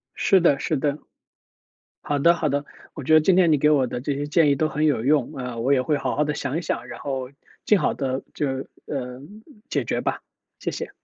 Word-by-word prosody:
是 195 - +4
的 145 -5 +3
是 155 - -1
的。 145 +1 -1 1.1
好 145 -1 -1
的 170 +4 +5
好 155 -2 -1
的， 145 +1 -1 0.3
我 150 - -7
觉 155 - +1
得 155 - +8
今 180 +4 +3
天 175 -4 +5
你 150 - +4
给 150 - +3
我 135 -4 +3
的 120 - -4
这 140 +3 -2
些 145 +1 -3
建 150 +1 +3
议 140 - +3
都 155 +2 +1
很 155 +1 0
有 125 -6 +1
用， 145 -3 +2
呃， 125 -3 -5
我 135 +4 +2
也 130 - +2
会 145 +1 0
好 - - -2
好 150 - +2
地 150 0 -2
想 140 +1 -3
一 170 - -2
想， 120 -5 -3
然 - - -8
后 130 -2 -4 0.4
尽 210 - +5
好 - - +1
地 130 -1 -3
就 150 - -1 0.4
呃， 125 -2 -5 0.5
解 - - -1
决 - - -1
吧， - - -2 0.4
谢 - - -3
谢。 - - -5
145 Hz, 255 characters per minute, -23 LUFS, 130-155 Hz, 1.1 s, 得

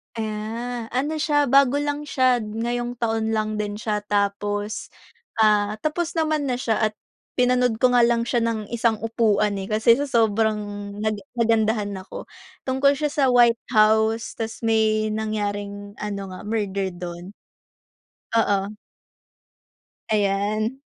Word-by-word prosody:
Ah, 225 +2 -4
ano 300 +4 -1
siya 295 -1 +2
bago 275 0 +4
lang 290 +1 -2
siya, 255 -3 +3
ngayong 240 +3 -3
taon 225 -1 -1
lang 215 0 -1
din 205 -1 -3
siya. 210 -1 -2
Tapos, 205 +1 -2 0.5
ah, 210 -1 +3
tapos 330 +2 -1
naman 310 -3 0
na 250 - 0
siya, 225 -3 +1
at 215 - -8 0.4
pinanood 250 -2 +2
ko 250 - +6
nga 245 - +4
lang 235 0 +3
siya 240 0 0
ng 225 -2 -2
isang 230 -1 +1
upuan, 210 -3 +1
eh, 190 - -5
kasi 220 +4 +4
sa 285 - -1
sobrang 220 -3 +2 0.5
naga 215 -1 -1 0.2
nagandahan 220 -2 +1
ako. 185 - -8 0.4
Tungkol 275 +2 +2
siya 295 0 -1
sa 285 -2 +2
White 240 -2 +5 0.2
House, 220 +1 +3
tapos 225 +1 -5
may 215 -1 +2
nangyaring 205 -1 -3
ano 205 -1 -4
nga, 185 - -8
murder 200 -3 -1
dun. 175 +2 -8 1.0
Oo. 205 -2 +1 1.4
Ayan. 215 +4 0
220 Hz, 135 wpm, -23 LUFS, 210-245 Hz, 1.4 s, ko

